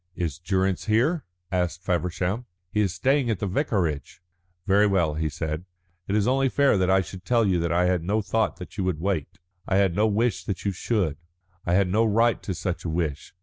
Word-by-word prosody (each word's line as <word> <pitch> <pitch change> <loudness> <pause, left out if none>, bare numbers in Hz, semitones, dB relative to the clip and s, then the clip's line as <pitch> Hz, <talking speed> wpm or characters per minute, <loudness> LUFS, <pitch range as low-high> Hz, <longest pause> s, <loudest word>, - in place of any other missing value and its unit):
"Is 85 -4 -3
Durrance 95 +1 0
here?" 125 +9 +2 0.3
asked 90 -1 -1
Feversham. 90 +5 -1 0.2
"He 105 - +1
is 100 -4 +1
staying 130 +7 +1
at 110 - +1
the 100 - -3
vicarage." 90 - -1 0.5
"Very 100 +2 +4
well," 90 -6 +2
he 80 0 -1
said. 75 +2 -4 0.4
"It 100 - 0
is 105 +1 +2
only 135 +1 +3
fair 140 -1 +3
that 95 -1 +2
I 95 0 +5
should 95 0 -9
tell 115 +1 +2
you 90 -4 +1
I 90 +1 +3
had 90 -1 +2
no 100 +6 0
thought 110 +1 0
that 90 +3 -10
you - - +1
would 90 -4 -1
wait. 90 -4 -2 0.3
I 95 - +1
had 95 -3 +3
no 105 +3 +3
wish 105 -3 +1
that 100 -1 -4
you 100 - +2
should; 90 -5 -1 0.5
I 85 - +3
had 100 0 +3
no 105 +5 +2
right 115 +1 +2
to 95 - -4
such 90 +1 -3
a 85 - -3
wish. 80 -1 -3
95 Hz, 210 wpm, -25 LUFS, 85-110 Hz, 0.5 s, I